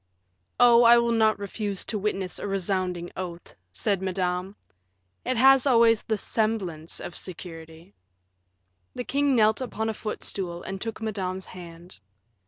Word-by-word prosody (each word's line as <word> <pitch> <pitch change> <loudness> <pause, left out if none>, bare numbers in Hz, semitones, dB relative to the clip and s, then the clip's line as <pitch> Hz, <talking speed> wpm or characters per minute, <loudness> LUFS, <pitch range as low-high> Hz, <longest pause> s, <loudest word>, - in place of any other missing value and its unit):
"Oh, 240 -1 +7
I 235 0 +8
will 235 0 +2
not 220 -1 +3
refuse 200 -1 -3
to 215 - -3
witness 195 -2 -2
a - - -4
resounding 185 -2 -2
oath," 175 -2 -7 0.2
said 190 - -1
Madame; 185 0 -2 0.7
"it 255 0 -1
has 270 +2 +6
always 230 -3 +5
the 220 - -2
semblance 195 -8 -2
of 175 - -7
security." 165 0 -9 1.0
The 245 - -3
king 280 +1 +1
knelt 220 +1 +3
upon 225 -3 -3
a - - -1
footstool 190 -5 -5
and 195 0 -6
took 225 -1 -5
Madame's 190 -3 -3
hand. 170 - -12
200 Hz, 140 wpm, -26 LUFS, 180-225 Hz, 1.0 s, I